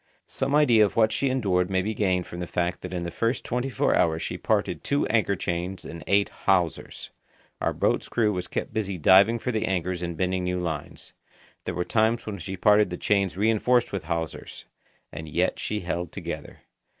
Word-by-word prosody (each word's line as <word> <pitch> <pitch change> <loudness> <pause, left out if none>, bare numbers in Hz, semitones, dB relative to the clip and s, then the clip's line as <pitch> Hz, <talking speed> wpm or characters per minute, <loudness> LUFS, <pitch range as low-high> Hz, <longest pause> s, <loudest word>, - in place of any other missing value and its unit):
Some 140 +2 -1
idea 125 -8 +5
of 105 - 0
what 110 -1 +4
she 135 - 0
endured 95 -8 +1
may 95 -1 +1
be 110 +3 -2
gained 95 -4 0
from 85 - -8
the 90 - -4
fact 90 +1 -2
that - - -7
in 90 -2 -3
the 85 - -4
first 115 +7 -1
twenty 125 +2 -2
four 125 - +1
hours 80 -1 +2
she - - -3
parted - - -1
two 140 0 +1
anchor 110 -3 +2
chains 90 +1 -3
and 80 0 -8
eight 100 0 +3 0.2
hawsers. 90 -5 0 0.5
Our - - +1
boat's - - 0
crew 110 -3 +1
was 90 -1 -4
kept - - -4
busy 100 -4 -2
diving 95 +7 +6
for 125 +2 -3
the 110 -2 -1
anchors 90 -1 -1
and 85 -2 -4
bending 90 +1 0
new 90 0 -1
lines. 80 -5 -5 0.5
There - - -3
were 90 - -1
times 110 +1 +1
when 100 -3 -5
she 95 +3 -6
parted 105 +1 +4
the 90 - -5
chains 100 -3 +1
reinforced 115 +4 +2
with 95 -4 -4
hawsers. 80 -1 -5 0.5
And 80 +1 -7
yet - - 0
she 105 0 -2
held 85 -1 -3
together. - - -7
95 Hz, 200 wpm, -26 LUFS, 90-110 Hz, 0.5 s, diving